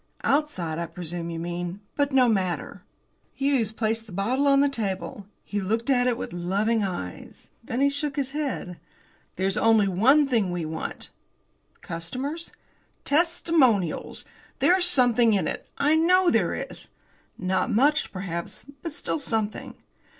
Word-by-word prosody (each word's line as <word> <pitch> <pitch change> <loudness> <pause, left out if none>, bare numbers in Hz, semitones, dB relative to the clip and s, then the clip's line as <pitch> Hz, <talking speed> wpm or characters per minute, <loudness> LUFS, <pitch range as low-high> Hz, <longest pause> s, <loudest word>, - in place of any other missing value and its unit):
"Outside, 185 - 0
I 170 - -3
presume, 170 0 -5
you 165 - -4
mean. 175 +2 -4 0.2
But 285 0 +1
no 260 -2 +5
matter." 190 -6 -1 0.5
Hughes 270 -6 +1
placed 225 0 -2
the - - -12
bottle 240 +10 0
on 275 0 +5
the 285 - +4
table. 200 -5 -4 0.2
He 205 0 -3
looked 225 +7 0
at 250 -1 +3
it 240 -2 +1
with - - -6
loving 200 +6 0
eyes. 175 - -6
Then 235 +3 -3
he 280 - +5
shook 285 0 +2
his 270 -2 -1
head. 275 - -4 0.6
"There's 190 +1 -1
only 220 -3 +4
one 260 +11 +4
thing 225 -8 +1
we 175 -2 -3
want." 160 +1 -4 0.7
"Customers?" 260 - -5 0.5
"Testimonials! 290 - +2 0.3
There's 365 0 +4
something 245 -8 +5
in 195 - 0
it. - - -4
I 295 +2 +3
know 360 +2 +4
there - - +1
is." - - -6 0.5
"Not 185 0 0
much, 285 +7 +2
perhaps, 175 -3 -5 0.2
but 330 -4 -5
still 315 - -3
something." 220 -6 -3
225 Hz, 145 wpm, -25 LUFS, 185-280 Hz, 0.7 s, no